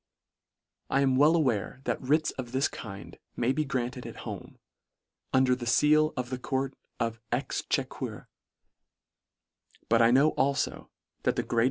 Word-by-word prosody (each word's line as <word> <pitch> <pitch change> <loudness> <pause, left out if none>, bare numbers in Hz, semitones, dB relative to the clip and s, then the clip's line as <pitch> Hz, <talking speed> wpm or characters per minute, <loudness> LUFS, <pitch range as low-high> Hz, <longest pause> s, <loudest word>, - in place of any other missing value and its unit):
I 135 - +2
am 135 -2 +3
well 150 +5 +5
aware 130 -5 0
that - - -2
writs 150 +4 +2
of 125 -2 -7
this 135 +2 +2
kind 100 -3 -9 0.2
may 120 +1 +1
be 155 +3 0
granted 125 -2 -3
at - - -9
home, - - -7 0.7
under 130 -1 +4
the 125 -1 -3
feal 155 +5 +4
of 125 -1 -3
the 130 - -3
court 135 +1 -2 0.3
of 115 0 -1
exchequer: 125 +4 -2 1.6
But 115 0 +5
I 115 - +6
know 140 +5 +5
alfo 140 +2 0 0.3
that - - +1
the - - 0
greater! 115 - -1
130 Hz, 150 wpm, -29 LUFS, 120-140 Hz, 1.6 s, I